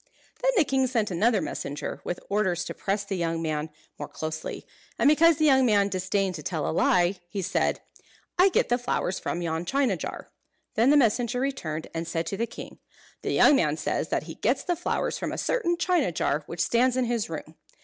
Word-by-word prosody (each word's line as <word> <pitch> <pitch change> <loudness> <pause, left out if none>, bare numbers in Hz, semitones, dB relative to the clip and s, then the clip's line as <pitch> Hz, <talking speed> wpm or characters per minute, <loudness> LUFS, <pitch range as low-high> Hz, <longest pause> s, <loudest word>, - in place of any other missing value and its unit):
Then - - +2
the 350 - +6
king 265 -2 +1
sent 225 -5 0
another 210 +3 +2
messenger, 145 +1 -5
with 175 - -4
orders 190 -4 0
to - - -5
press 200 +1 -2
the 200 -1 -3
young 165 -1 -1
man 155 -1 -2 0.3
more - - -4
closely; 155 0 -5 0.3
and - - +3
because 320 +1 +5
the 310 - +2
young 265 -3 +5
man 205 -4 +3
disdained 190 +1 -1
to 155 - -6
tell 165 -2 -2
a - - 0
lie, 180 +3 +2
he 195 +2 -3
said, 190 - 0 0.5
"I 370 +2 +5
get - - +1
the 245 +1 +2
flowers 245 -6 -1
from 175 - -3
yon 165 0 -2
china 265 0 +1
jar." - - -7 0.4
Then 230 +4 +3
the 295 - +6
messenger 245 -1 +2
returned, 165 - -3
and 165 0 -4
said 165 0 -2
to 195 - -3
the 230 - -1
king, - - -10 0.4
"The - - -2
young 290 - +6
man 155 - +1
says - - -2
that - - 0
he - - -8
gets - - 0
the 355 - 0
flowers 345 - -2
from - - -3
a - - -4
certain 345 -9 0
china 345 - +1
jar 155 -1 0
which 170 - -4
stands 250 +2 +2
in 255 - +2
his 235 -5 -1
room." 160 0 -7
200 Hz, 210 wpm, -26 LUFS, 170-260 Hz, 0.5 s, the